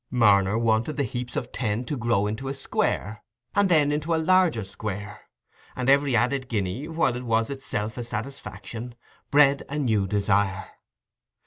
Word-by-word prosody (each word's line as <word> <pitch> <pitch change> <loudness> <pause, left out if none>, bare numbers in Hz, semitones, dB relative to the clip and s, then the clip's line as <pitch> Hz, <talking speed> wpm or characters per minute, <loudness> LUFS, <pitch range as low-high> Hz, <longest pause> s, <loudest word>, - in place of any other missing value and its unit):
Marner 105 -4 +4
wanted 115 +5 +1
the 140 - +1
heaps 120 0 -5
of 120 - -3
ten 115 0 -2
to 150 - -3
grow 120 -5 +1
into 110 +6 -3
a 135 - -3
square, 110 -5 -2 0.3
and 200 -1 +3
then 150 -4 +4
into 155 +3 0
a - - +1
larger 185 - +3
square; 100 +1 -7 0.5
and 125 0 -1
every 140 -2 +3
added 130 +3 +1
guinea, 105 +6 -2
while 160 -6 +1
it 125 - -5
was 115 +1 +1
itself 110 -4 -4
a - - -3
satisfaction, 120 0 -6 0.3
bred 140 -1 +5
a 145 - -3
new 110 -9 +1
desire. 100 -1 +1
120 Hz, 160 wpm, -25 LUFS, 105-140 Hz, 0.5 s, bred